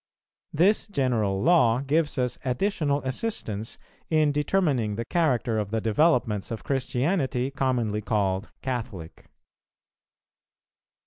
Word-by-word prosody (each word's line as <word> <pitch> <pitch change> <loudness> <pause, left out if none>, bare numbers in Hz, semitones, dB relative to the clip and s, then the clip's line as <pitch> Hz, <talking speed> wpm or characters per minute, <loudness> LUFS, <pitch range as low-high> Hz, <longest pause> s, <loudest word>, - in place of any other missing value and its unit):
This 185 +10 +2
general 115 - 0
law 130 -9 +4
gives 150 +2 0
us 125 -1 -1
additional 145 +1 0
assistance 130 - -3 0.3
in 155 -2 +3
determining 145 - +1
the 115 +2 -4
character 125 -9 +1
of 105 -2 -3
the 110 +1 -1
developments 110 - +1
of 115 -2 -5
Christianity 135 0 -1
commonly 125 -6 0
called 100 -2 -1
Catholic. 110 -10 -5
125 Hz, 105 wpm, -26 LUFS, 110-150 Hz, 0.3 s, law